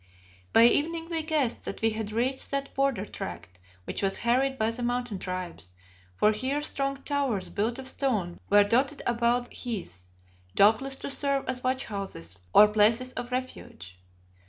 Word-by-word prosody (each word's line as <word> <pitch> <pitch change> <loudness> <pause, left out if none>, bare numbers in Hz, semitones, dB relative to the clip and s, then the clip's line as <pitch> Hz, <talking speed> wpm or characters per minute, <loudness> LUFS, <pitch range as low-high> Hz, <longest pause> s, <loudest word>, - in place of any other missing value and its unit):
By 225 - +6
evening 325 +7 +3
we 325 -1 +1
guessed 305 -6 0
that - - -6
we 225 - +4
had 215 -1 -4
reached 250 +4 0
that 275 0 -3
border 270 -7 0
tract 90 - -8 0.2
which - - -3
was 195 -1 0
harried 265 +3 +2
by 220 -1 +1
the 235 +2 -6
Mountain 245 -4 -2
tribes, 175 - -6 0.4
for 210 - +4
here 260 +7 -1
strong 275 -1 -2
towers 275 -9 -1
built 225 +4 -1
of 265 -1 -7
stone 220 -10 -2
were 205 0 +6
dotted 260 +8 +1
about 240 +1 +1
the - - -14
heaths, 175 - -4 0.5
doubtless 225 +7 +4
to 270 - -4
serve 280 -1 +1
as 255 -1 -3
watch 260 +1 0
houses 145 - -6
or 210 - +8
places 225 +4 +3
of 245 +1 -6
refuge. 95 - -6
240 Hz, 165 wpm, -27 LUFS, 205-270 Hz, 0.5 s, or